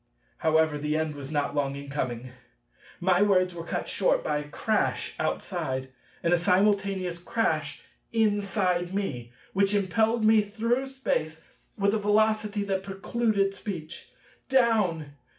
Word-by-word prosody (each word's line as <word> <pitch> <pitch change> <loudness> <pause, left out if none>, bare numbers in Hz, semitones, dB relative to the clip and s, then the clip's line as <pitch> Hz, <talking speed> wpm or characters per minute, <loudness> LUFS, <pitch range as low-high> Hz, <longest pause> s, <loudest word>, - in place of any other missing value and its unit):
However, 160 -1 +2
the 150 +1 0
end 160 -1 -1
was 140 -2 -8
not 145 -2 0
long 140 -1 0
in 140 0 -8
coming. 130 -3 -3 0.7
My 180 +1 +3
words 185 -3 +3
were 170 -1 -6
cut - - -3
short - - +1
by 150 - 0
a 150 0 -8
crash - - 0
outside, 130 0 -2 0.3
and 170 +1 +3
a 175 - +4
simultaneous 190 -1 +1
crash 160 -7 -1 0.3
inside 200 -5 +1
me, 125 -12 -3 0.2
which 200 +1 +2
impelled 220 +4 +2
me 220 0 +6
through 230 +5 -1
space 160 -12 -2 0.3
with 200 0 +2
a 220 - +1
velocity 210 0 +2
that 195 -1 -1
precluded 195 +1 0
speech. 180 -7 -7
190 Hz, 135 wpm, -27 LUFS, 155-210 Hz, 0.7 s, me